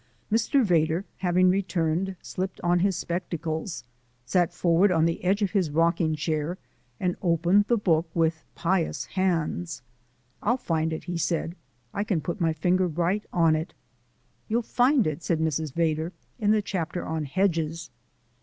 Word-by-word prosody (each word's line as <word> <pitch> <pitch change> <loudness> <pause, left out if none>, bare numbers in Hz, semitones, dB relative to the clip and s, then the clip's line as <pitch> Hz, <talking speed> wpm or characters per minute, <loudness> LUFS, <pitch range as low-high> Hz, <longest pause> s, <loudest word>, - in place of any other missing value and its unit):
Mr. 230 +5 +3
Vedder, 170 0 +2
having 185 0 +3
returned, 185 -1 0
slipped 185 0 -4
on 175 0 +2
his 195 +1 +2
spectacles, 170 -3 -3 0.4
sat 175 +6 +2
forward 175 +3 +3
on 160 -2 +3
the 165 0 -1
edge 195 +3 +2
of 195 - 0
his 190 -7 +1
rocking 165 +1 +2
chair, 155 +3 -2 0.4
and 180 -1 0
opened 175 +3 +3
the 240 - +3
book 165 -5 +1
with 160 -1 +1
pious 175 -1 0
hands. 175 -3 -1 0.6
"I'll 240 +4 +2
find 160 -7 -1
it," 160 - -4
he 175 -1 -4
said. 170 0 -1 0.4
"I 200 - -1
can 200 -6 0
put 175 +4 -4
my 165 -1 +3
finger 180 +4 +1
right 175 +5 0
on 165 -2 +4
it." 160 +2 -4 0.7
"You'll 235 +2 0
find 250 +2 +3
it," 155 +1 -2
said 165 0 0
Mrs. 160 -1 -1
Vedder, 160 +2 0 0.3
"in 210 -2 +1
the 215 -1 +3
chapter 175 -3 -3
on 160 -1 -2
'Hedges.'" 165 -2 -1
170 Hz, 155 wpm, -26 LUFS, 160-190 Hz, 0.7 s, on